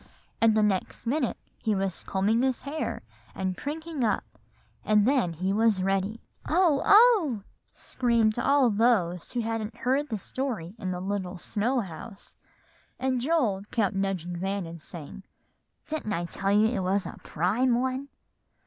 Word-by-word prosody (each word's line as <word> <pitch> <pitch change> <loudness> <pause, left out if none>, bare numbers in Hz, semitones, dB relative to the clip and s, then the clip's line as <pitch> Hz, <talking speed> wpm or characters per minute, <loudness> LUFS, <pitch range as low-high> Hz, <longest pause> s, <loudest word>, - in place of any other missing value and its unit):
and 225 -1 +5
the 215 - +4
next 200 +1 -1
minute 260 +1 0 0.2
he 215 -2 +1
was 195 -2 -2
combing 205 +5 +1
his 260 -1 0
hair, 295 +3 -3 0.3
and 190 -1 -2
prinking 310 - -4
up, 215 - +1 0.6
and 210 -1 +4
then 255 -9 +2
he 185 +4 -1
was 215 -3 +2
ready." 195 +3 0 0.3
"Oh! 325 -4 +3
oh!" 400 - +5 0.3
screamed 235 -3 +1
all 275 -2 +4
those 200 -6 +1
who 245 - 0
hadn't 225 -1 -3
heard 270 +3 0
the 220 - -2
story 210 -5 -4
in 185 - -3
the 180 -1 -3
little 190 -1 -3
snow 235 +8 0
house; 195 +2 -10 0.6
and 260 -1 0
Joel 250 -10 +1
kept 210 -5 +1
nudging 190 -3 -2
Van 195 +1 -2
and 165 -1 -9
saying, 165 +3 -9 0.6
"Didn't 300 -9 -3
I 175 -2 -1
tell 195 +3 -2
you 210 +2 +5
it 225 0 +1
was 190 +2 0
a - - -8
prime 235 +9 +1
one?" 260 +2 -2
215 Hz, 155 wpm, -27 LUFS, 190-260 Hz, 0.6 s, and